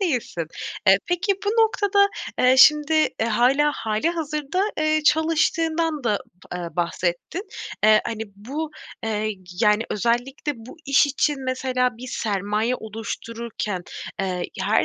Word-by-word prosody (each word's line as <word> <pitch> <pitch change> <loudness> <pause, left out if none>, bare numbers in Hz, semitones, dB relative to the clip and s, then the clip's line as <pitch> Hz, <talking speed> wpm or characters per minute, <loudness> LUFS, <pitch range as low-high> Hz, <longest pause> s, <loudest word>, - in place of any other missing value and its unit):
değilsin. 250 - -1 0.4
Eee, 190 0 +7
peki 355 +3 +1
bu 405 - 0
noktada, 420 -3 +3 0.3
eee, 255 +1 +5
şimdi, 300 +2 +6 0.3
eee, 220 - +2
hâlâ, 255 +6 +3
hâlihazırda, 305 - -1 0.2
eee, 310 0 +2
çalıştığından 320 -1 +2
da 210 -3 +2 0.3
p - - -3
eee, 175 -1 -4
bahsettin. 175 - -2 0.4
Eee, 215 0 +7
hani, 220 -1 -3
bu, 285 +9 -5 0.3
eee, 215 -1 -1 0.3
yani, 210 +1 +4
özellikle 245 +7 -1
bu 230 +8 -12
iş 275 +1 +5
için 285 0 0
mesela 255 -1 0
bir 250 +2 -8
sermaye 210 +2 -1
oluştururken, 220 -2 -5 0.4
eee, 195 - -1 0.3
ya - - -3
her - - +3
255 Hz, 130 wpm, -23 LUFS, 215-310 Hz, 0.4 s, Eee